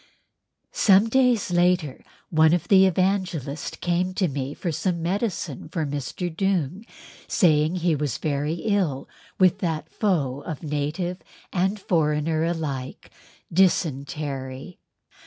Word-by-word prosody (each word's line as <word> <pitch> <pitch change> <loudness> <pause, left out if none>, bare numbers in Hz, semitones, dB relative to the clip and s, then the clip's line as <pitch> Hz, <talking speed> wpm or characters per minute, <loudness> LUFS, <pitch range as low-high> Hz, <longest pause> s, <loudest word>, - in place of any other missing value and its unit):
Some 200 +2 +4
days 250 -6 +2
later 175 -5 +1 0.3
one 160 0 +5
of 175 - -4
the 190 -1 +7
Evangelists 185 -6 -1
came 180 +1 -1
to 185 - +2
me 140 -1 -4
for 175 - -3
some 170 +1 -2
medicine 180 - -2
for 160 -2 -2
Mr. 145 +4 -4
Doong, 190 - -1 0.4
saying 155 -3 +3
he 175 -2 +1
was 145 -5 -2
very 150 +1 -1
ill 185 -11 0 0.3
with 185 -2 +4
that 165 -4 -3
foe 145 - 0
of 155 0 -6
native 155 +5 -2 0.3
and 190 +3 0
foreigner 155 -3 +1
alike—dysentery. 145 -1 -2
165 Hz, 115 wpm, -24 LUFS, 150-185 Hz, 0.4 s, the